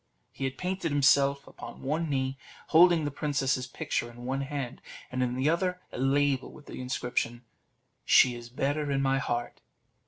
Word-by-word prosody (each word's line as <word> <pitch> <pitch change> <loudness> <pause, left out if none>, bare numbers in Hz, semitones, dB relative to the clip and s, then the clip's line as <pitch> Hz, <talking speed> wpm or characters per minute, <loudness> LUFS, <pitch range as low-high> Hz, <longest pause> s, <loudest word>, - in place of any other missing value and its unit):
He 135 - -4
had 135 0 -3
painted 180 -3 -2
himself 140 0 +4
upon - - -10
one 155 +4 -1
knee, 135 -1 0 0.3
holding 170 -1 +6
the 145 - -2
princess's 140 -3 0
picture 120 -1 -2
in 120 +1 -11
one 135 +2 -1
hand, 140 -3 -4 0.3
and 130 0 -1
in 125 -1 0
the 130 +3 0
other 180 +3 +1
a - - -6
label 135 0 +1
with 150 - -14
this - - -9
inscription 125 -1 -2 0.6
"She 125 - +6
is 120 0 -9
better 145 +4 -1
in 135 -1 +1
my 135 0 +2
heart." 120 -2 -3
135 Hz, 175 wpm, -29 LUFS, 130-145 Hz, 0.6 s, holding